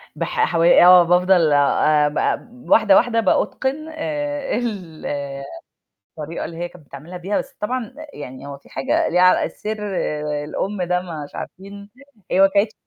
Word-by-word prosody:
بح 455 Hz, -3 st, 0 dB
حو 165 Hz, -1 st, 0 dB
آه، 175 Hz, +1 st, +7 dB
بافضل 180 Hz, -1 st, +3 dB
آآ، 150 Hz, +1 st, +3 dB
آآ، -, -, +1 dB
ب 245 Hz, +1 st, -17 dB
واحدة، 215 Hz, -3 st, +5 dB
واحدة 230 Hz, 0 st, +3 dB
بأُتقن 265 Hz, +8 st, -1 dB
آآ، 290 Hz, -2 st, -3 dB
ال 195 Hz, -10 st, -5 dB, 1.2 s
الطريقة 155 Hz, +3 st, -5 dB
اللي 165 Hz, -, -8 dB
هي 175 Hz, +1 st, -4 dB
كانت 175 Hz, -4 st, -18 dB
بتعملها 150 Hz, +7 st, -10 dB
بيها، 190 Hz, +4 st, -2 dB
بس 275 Hz, 0 st, -7 dB
طبعًا 245 Hz, +2 st, -3 dB
آآ، 310 Hz, -, -9 dB
يعني 130 Hz, -1 st, -9 dB
هو 140 Hz, -1 st, -8 dB
في -, -, -22 dB
حاجة 135 Hz, -, 0 dB
ليها 180 Hz, +1 st, +2 dB
ع 185 Hz, -, +5 dB
السر 215 Hz, +1 st, -5 dB, 0.2 s
آآ، 150 Hz, -2 st, -2 dB
الأم 195 Hz, +6 st, -3 dB
ده 180 Hz, 0 st, 0 dB, 0.2 s
مش 145 Hz, -, -15 dB
عارفين، 200 Hz, +2 st, -9 dB, 0.4 s
هي 185 Hz, -, +2 dB
ما 195 Hz, -, +8 dB
كانتش 205 Hz, +2 st, +2 dB
185 Hz, 170 wpm, -20 LUFS, 160-230 Hz, 1.2 s, ما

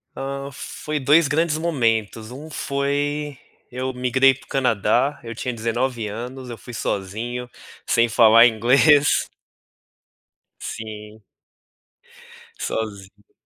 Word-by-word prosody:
Hã, 140 Hz, +1 st, -5 dB
foi 150 Hz, +4 st, -5 dB
2 150 Hz, +4 st, +5 dB
grandes 155 Hz, +2 st, +1 dB
momentos. 115 Hz, -8 st, -1 dB
Um 150 Hz, +5 st, -9 dB
foi 145 Hz, 0 st, -2 dB, 0.3 s
eu 130 Hz, +1 st, -3 dB
migrei 130 Hz, +2 st, +3 dB
para 135 Hz, -, -17 dB
o -, -, -28 dB
Canadá, 125 Hz, +2 st, +1 dB
eu 115 Hz, 0 st, -6 dB
tinha 125 Hz, +1 st, -4 dB
19 115 Hz, +1 st, -2 dB
anos, 125 Hz, +4 st, -7 dB
eu 115 Hz, -, -7 dB
fui 125 Hz, -, -11 dB
sozinho, 115 Hz, +5 st, -3 dB, 0.4 s
sem 115 Hz, 0 st, +3 dB
falar 115 Hz, 0 st, +7 dB
inglês. 135 Hz, +6 st, +4 dB, 1.3 s
Sim. 110 Hz, 0 st, -8 dB, 1.4 s
Sozinho. 100 Hz, -2 st, -6 dB
125 Hz, 105 wpm, -22 LUFS, 110-140 Hz, 1.4 s, falar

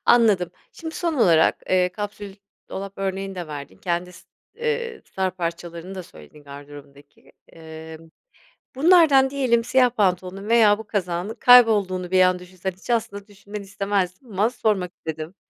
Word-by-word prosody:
Anladım. 210 Hz, -7 st, +4 dB, 0.2 s
Şimdi 320 Hz, -1 st, -8 dB
son 340 Hz, -2 st, -1 dB
olarak, 170 Hz, -, +3 dB
eee, 185 Hz, -1 st, +3 dB
kapsül 205 Hz, 0 st, -7 dB, 0.3 s
dolap 195 Hz, 0 st, -6 dB
örneğini 195 Hz, 0 st, -3 dB
de 175 Hz, -3 st, -6 dB
verdin. 140 Hz, -9 st, -8 dB
Kendi 175 Hz, -, -3 dB
s -, -, -16 dB, 0.3 s
eee, 470 Hz, -1 st, -3 dB
star 190 Hz, -1 st, -2 dB
parçalarını 170 Hz, +1 st, -5 dB
da 185 Hz, -, -6 dB
söyledin 80 Hz, -, -16 dB
gardırobundaki. 145 Hz, 0 st, -14 dB, 0.2 s
Emm, 160 Hz, 0 st, -11 dB, 0.7 s
bunlardan 295 Hz, -3 st, +5 dB
diyelim 255 Hz, -4 st, +1 dB
siyah 250 Hz, +1 st, +3 dB
pantolonun 195 Hz, -3 st, -1 dB
veya 220 Hz, -3 st, +5 dB
bu 220 Hz, 0 st, -10 dB
kazağının 180 Hz, +1 st, -2 dB
kaybolduğunu 210 Hz, -7 st, +5 dB
bir 185 Hz, 0 st, +4 dB
an 185 Hz, 0 st, +3 dB
düşünsen. 185 Hz, +1 st, -6 dB
Hiç 185 Hz, +6 st, -17 dB
aslında 205 Hz, -4 st, -2 dB
düşünmeni 205 Hz, 0 st, -9 dB
istemezdim 195 Hz, +2 st, -2 dB
ama 205 Hz, +4 st, +1 dB
sormak 210 Hz, -7 st, -1 dB
istedim. 160 Hz, -1 st, -7 dB
190 Hz, 145 wpm, -23 LUFS, 175-225 Hz, 0.7 s, bunlardan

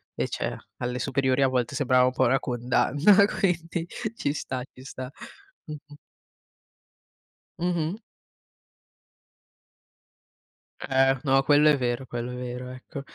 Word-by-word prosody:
Invece -, -, -3 dB, 0.2 s
alle 125 Hz, 0 st, -3 dB
superiori 135 Hz, 0 st, +1 dB
a -, -, +5 dB
volte 125 Hz, -2 st, -1 dB
sembrava 130 Hz, -3 st, +3 dB
un 130 Hz, -, +2 dB
po' -, -, +1 dB
una 135 Hz, +2 st, +3 dB
condanna, 140 Hz, -, +3 dB
quindi 170 Hz, -4 st, -1 dB, 0.3 s
ci 145 Hz, -, -1 dB
sta, 130 Hz, -3 st, -4 dB
ci 130 Hz, -, -14 dB
sta, 130 Hz, -1 st, -7 dB, 0.5 s
mh-mh. 150 Hz, -1 st, -10 dB, 1.6 s
Mh-mh. 175 Hz, +1 st, -1 dB, 2.8 s
Eh, 135 Hz, 0 st, +2 dB
no, 135 Hz, -1 st, +4 dB
quello 145 Hz, +2 st, +5 dB
è 150 Hz, -, +4 dB
vero, 125 Hz, 0 st, -2 dB
quello 120 Hz, 0 st, -5 dB
è -, -, -6 dB
vero, 125 Hz, 0 st, -6 dB
ecco. 130 Hz, +3 st, -8 dB
135 Hz, 120 wpm, -26 LUFS, 125-150 Hz, 2.8 s, a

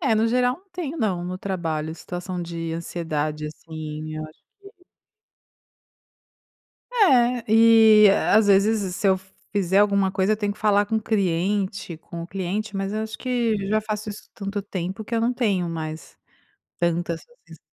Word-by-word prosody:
É, 265 Hz, -9 st, +2 dB
no 220 Hz, +1 st, +2 dB
geral 250 Hz, +2 st, +2 dB
não 390 Hz, +2 st, -30 dB
tenho, 335 Hz, -4 st, -5 dB
não. 190 Hz, -8 st, 0 dB
No 180 Hz, +1 st, -4 dB
trabalho 165 Hz, -6 st, -3 dB
situação 180 Hz, +1 st, -6 dB
de 165 Hz, -1 st, -5 dB
ansiedade, 155 Hz, -2 st, -3 dB
assim. 155 Hz, 0 st, -7 dB
Eu 155 Hz, -, -4 dB
acho 155 Hz, -, -18 dB, 0.2 s
que 395 Hz, -2 st, -17 dB, 2.2 s
É. 250 Hz, -, +4 dB
E, 220 Hz, -2 st, +7 dB, 0.2 s
às 215 Hz, 0 st, +5 dB
vezes, 205 Hz, +2 st, +4 dB
s 190 Hz, -2 st, -3 dB
se 190 Hz, -, -2 dB
eu 190 Hz, 0 st, +3 dB, 0.3 s
fizer 195 Hz, -2 st, +2 dB
alguma 200 Hz, -2 st, +3 dB
coisa, 195 Hz, +2 st, +2 dB
eu -, -, +1 dB
tenho 205 Hz, -1 st, -1 dB
que 205 Hz, -, -17 dB
falar 205 Hz, -1 st, +3 dB
com 220 Hz, +2 st, 0 dB
o 220 Hz, -, -2 dB
cliente 195 Hz, -2 st, -1 dB
com 170 Hz, +1 st, -8 dB
o -, -, -7 dB
cliente. 195 Hz, +3 st, -3 dB
Mas, 195 Hz, 0 st, -2 dB
eu 215 Hz, +1 st, -2 dB
acho 220 Hz, 0 st, -6 dB
que, 240 Hz, -3 st, 0 dB
já, 215 Hz, +1 st, +2 dB
faço 215 Hz, 0 st, -4 dB
isso 205 Hz, -, -10 dB
tanto 200 Hz, 0 st, -4 dB
tempo 190 Hz, +1 st, -5 dB
que, 230 Hz, -, -4 dB
eu 225 Hz, -, +2 dB
não 235 Hz, +2 st, +1 dB
tenho 200 Hz, -8 st, 0 dB
mais, 160 Hz, -1 st, -6 dB, 0.6 s
tantas 170 Hz, -1 st, 0 dB, 0.3 s
essas -, -, -13 dB
200 Hz, 175 wpm, -24 LUFS, 170-220 Hz, 2.2 s, E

